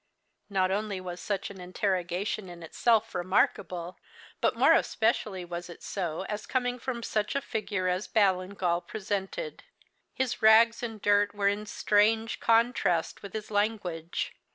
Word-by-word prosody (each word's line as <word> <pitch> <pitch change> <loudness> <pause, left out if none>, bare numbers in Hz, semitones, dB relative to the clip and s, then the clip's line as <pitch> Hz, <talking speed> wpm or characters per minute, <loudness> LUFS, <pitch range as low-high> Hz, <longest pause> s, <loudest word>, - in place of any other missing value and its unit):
Not 190 -2 +1
only 205 -1 -1
was 180 -1 -6
such 200 +2 -3
an 190 -2 -10
interrogation 185 +1 -2
in 170 -1 -10
itself 225 +6 +1
remarkable, 180 -1 0 0.4
but - - +2
more - - +6
especially 215 -5 +1
was 175 0 -6
it 170 - -11
so 175 -3 -3
as 210 +2 -5
coming 250 -1 -1
from 235 -1 -4
such 215 +1 -1
a - - +3
figure 210 -7 -2
as 180 +2 -1
Ballingall 185 -3 +1
presented. 205 - -4 0.5
His 255 -2 -1
rags 225 +1 +6
and 225 -3 -5
dirt 205 0 +2
were 200 -1 +2
in 210 +1 -3
strange 220 +2 +2
contrast 225 -7 +2
with 200 - -9
his 215 0 -5
language. 205 -6 -1
205 Hz, 145 wpm, -29 LUFS, 185-220 Hz, 0.5 s, more